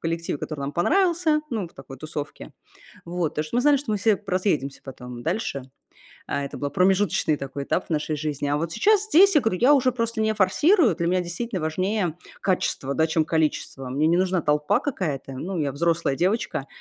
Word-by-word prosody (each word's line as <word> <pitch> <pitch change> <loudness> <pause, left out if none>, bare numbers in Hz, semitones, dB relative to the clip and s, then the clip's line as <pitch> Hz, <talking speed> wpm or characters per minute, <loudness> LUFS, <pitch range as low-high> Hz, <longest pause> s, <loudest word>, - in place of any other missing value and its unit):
коллективе, 165 -2 -2
который 150 0 -6
нам 140 +1 -3
понравился, 335 - +2
ну, 220 -7 -3
в 165 - -17
такой 135 0 -11
тусовке. 150 +1 -7 0.5
Вот. 170 -2 -2
Потому 150 - -2
что 155 - -6
мы - - +3
знали, 295 +1 +5
что 275 -5 -3
мы 210 - +1
все 210 +2 +3
поразъедемся 185 -8 -1
потом 125 -2 -9
дальше. 160 - -2 0.7
А 140 - -1
это 140 - -7
был 145 0 -3
промежуточный 185 -2 +2
такой 140 0 -6
этап 180 - -1
в - - -27
нашей 155 0 -1
жизни. 145 -1 -3
А 145 - +1
вот 165 +2 -2
сейчас 420 - +3
здесь 395 -1 +6 0.2
я 280 +4 +6
уже 260 -2 +3
просто 230 -2 -2
не 220 0 +2
форсирую. 220 - +3
Для 170 +1 -1
меня, 185 0 +2
действительно, 180 +3 -4
важнее 180 +2 -1 0.2
качество, 160 -7 -1
да, 160 +2 +2
чем 160 -1 +1
количество. 155 -4 -1
Мне 140 +5 0
не 170 +2 +3
нужна 185 0 +1
толпа 150 +5 +2
какая-то. 160 - -3
Ну, 175 +7 -4
я 140 -3 -1
взрослая 165 -1 0
девочка. 190 +10 -1
170 Hz, 195 wpm, -24 LUFS, 150-215 Hz, 0.7 s, здесь